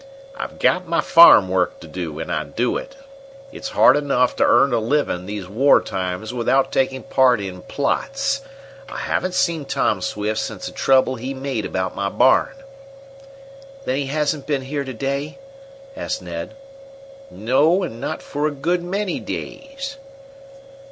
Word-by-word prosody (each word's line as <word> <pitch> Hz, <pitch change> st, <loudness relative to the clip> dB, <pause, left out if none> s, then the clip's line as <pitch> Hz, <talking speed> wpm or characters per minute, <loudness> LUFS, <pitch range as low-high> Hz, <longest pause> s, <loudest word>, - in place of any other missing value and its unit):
"I've -, -, -6 dB
got 185 Hz, -1 st, +1 dB
my 165 Hz, -, +1 dB
farm 165 Hz, -, +7 dB
work 90 Hz, -1 st, 0 dB
to -, -, -11 dB
do, 80 Hz, -2 st, -6 dB
and -, -, -5 dB
I -, -, -1 dB
do 120 Hz, +1 st, -2 dB
it. 275 Hz, -, -6 dB, 0.6 s
It's 275 Hz, -, -7 dB
hard 130 Hz, -, +5 dB
enough 135 Hz, -4 st, +1 dB
to -, -, +3 dB
earn 140 Hz, -, +4 dB
a 120 Hz, -, +2 dB
living 110 Hz, -7 st, -1 dB
these 100 Hz, -3 st, -5 dB
war 130 Hz, +9 st, +4 dB
times 95 Hz, +3 st, -4 dB
without 125 Hz, +2 st, +1 dB
taking 130 Hz, 0 st, 0 dB
part 130 Hz, -3 st, +3 dB
in 95 Hz, -2 st, -6 dB
plots. 275 Hz, -, -1 dB, 0.5 s
I -, -, -7 dB
haven't 185 Hz, 0 st, -2 dB
seen 170 Hz, -4 st, +1 dB
Tom 135 Hz, -8 st, 0 dB
Swift 105 Hz, +3 st, -2 dB
since -, -, -5 dB
the -, -, -5 dB
trouble 130 Hz, -1 st, +2 dB
he 130 Hz, +4 st, -5 dB
made 130 Hz, -4 st, -3 dB
about 95 Hz, 0 st, -2 dB
my 100 Hz, 0 st, -1 dB
barn." 130 Hz, -, +3 dB, 1.3 s
"Then 130 Hz, -, -1 dB
he 140 Hz, -1 st, -2 dB
hasn't 150 Hz, 0 st, -1 dB
been 140 Hz, -3 st, -1 dB
here 140 Hz, +1 st, -3 dB
to 130 Hz, -, -6 dB
day?" 140 Hz, -, -3 dB, 0.6 s
asked 300 Hz, -, -4 dB
Ned. -, -, -6 dB, 0.7 s
"No; 150 Hz, -, +2 dB
and 115 Hz, -9 st, -6 dB
not -, -, -4 dB
for 145 Hz, +1 st, -2 dB
a -, -, -2 dB
good 170 Hz, +5 st, -1 dB
many 190 Hz, +1 st, -2 dB
days." 275 Hz, 0 st, -7 dB
135 Hz, 160 wpm, -21 LUFS, 110-155 Hz, 1.3 s, farm